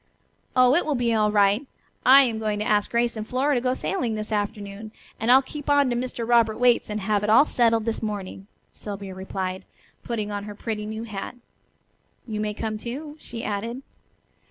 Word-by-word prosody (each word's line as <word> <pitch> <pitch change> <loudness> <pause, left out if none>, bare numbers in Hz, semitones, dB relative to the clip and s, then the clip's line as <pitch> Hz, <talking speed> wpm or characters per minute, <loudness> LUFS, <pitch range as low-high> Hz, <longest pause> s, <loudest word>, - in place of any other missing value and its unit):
"Oh, 255 0 +6
it 345 - +3
will 300 - -1
be 240 -2 +1
all 215 -1 +2
right. 205 +5 +3 0.4
I 275 +2 +9
am 230 -4 -1
going 215 -1 -1
to 210 - -2
ask 205 -1 +2
Grace 235 0 +1
and 215 0 -5
Flora 270 +4 +1
to 245 - +1
go 255 +1 0
sailing 245 - -2
this 215 +1 -5
afternoon, 205 0 -3 0.3
and 225 +2 +2
I'll 265 +2 +7
keep 290 +2 -7
on 285 -3 +4
to - - 0
Mr. 240 -1 -3
Robert 230 -2 +3
Waite's 245 -2 +3
and 210 0 -3
have 210 +1 0
it 210 - 0
all 230 +7 +7
settled 230 -5 +2
this 230 -1 -2
morning," 200 -2 -5 0.3
Sylvia 200 -2 -7
replied, 190 0 -4 0.4
putting 215 -3 -3
on 205 0 -4
her 210 -1 -8
pretty 210 -1 -4
new 220 +1 -5
hat. 215 +1 -6 0.9
"You 215 -3 -4
may 210 -1 -2
come, 215 -1 -3
too," 285 +7 -6
she 230 -5 -8
added. 230 +5 -4
220 Hz, 200 wpm, -24 LUFS, 210-245 Hz, 0.9 s, I